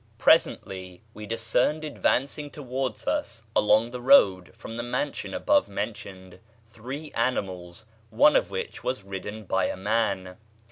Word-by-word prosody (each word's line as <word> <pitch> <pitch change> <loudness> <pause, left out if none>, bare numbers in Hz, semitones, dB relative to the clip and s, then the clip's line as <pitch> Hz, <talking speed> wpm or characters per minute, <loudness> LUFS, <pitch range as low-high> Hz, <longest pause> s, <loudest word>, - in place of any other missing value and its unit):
Presently 95 0 +1
we 105 0 -9
discerned 115 +7 0
advancing 145 0 0
towards 130 -4 -4
us 115 -1 -2
along 110 +3 +4
the 125 0 -6
road 95 - +5
from 115 -1 -8
the 120 - -3
mansion 120 0 -3
above - - +2
mentioned 95 -2 -6 0.3
three 130 +7 -8
animals, 95 -5 -2 0.2
one 295 +1 +5
of - - +2
which 470 -1 -5
was 125 -5 -2
ridden 100 +3 -6
by 95 -1 0
a - - -4
man. 100 -3 -1
115 Hz, 135 wpm, -26 LUFS, 95-130 Hz, 0.3 s, road